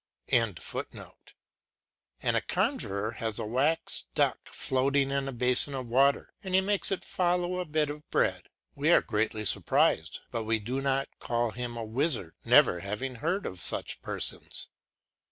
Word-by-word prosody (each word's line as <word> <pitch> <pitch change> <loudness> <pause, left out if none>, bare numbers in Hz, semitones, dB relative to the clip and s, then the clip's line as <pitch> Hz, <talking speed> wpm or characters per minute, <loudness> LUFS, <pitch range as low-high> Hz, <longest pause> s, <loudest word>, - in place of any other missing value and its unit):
] - - -33
and 115 -6 +1 1.7
a - - +1
conjuror 100 +3 -2
has 110 -2 -3
a - - 0
wax 140 - 0
duck - - +1
floating 135 +1 0
in 140 0 -1
a - - -3
basin 125 +3 +4
of 130 -2 -5
water, 135 +4 +2
and 185 -1 -2
he - - +6
makes 200 +1 +1
it 195 - -3
follow 180 0 -1
a 180 - -3
bit 155 -1 0
of 150 +1 -9
bread. - - 0 0.2
We 145 +3 -1
are 175 - +5
greatly 110 -1 -2
surprised, - - +1
but 115 - -3
we 110 +1 +1
do 125 +6 -4
not 135 0 -2
call 120 -1 -1
him 120 +1 -6
a 115 - -4
wizard, 120 - +1
never 90 - +5
having 105 +7 -5
heard 175 - -2
of 90 -1 -3
such - - +5
persons. - - -1
130 Hz, 160 wpm, -28 LUFS, 115-150 Hz, 1.7 s, he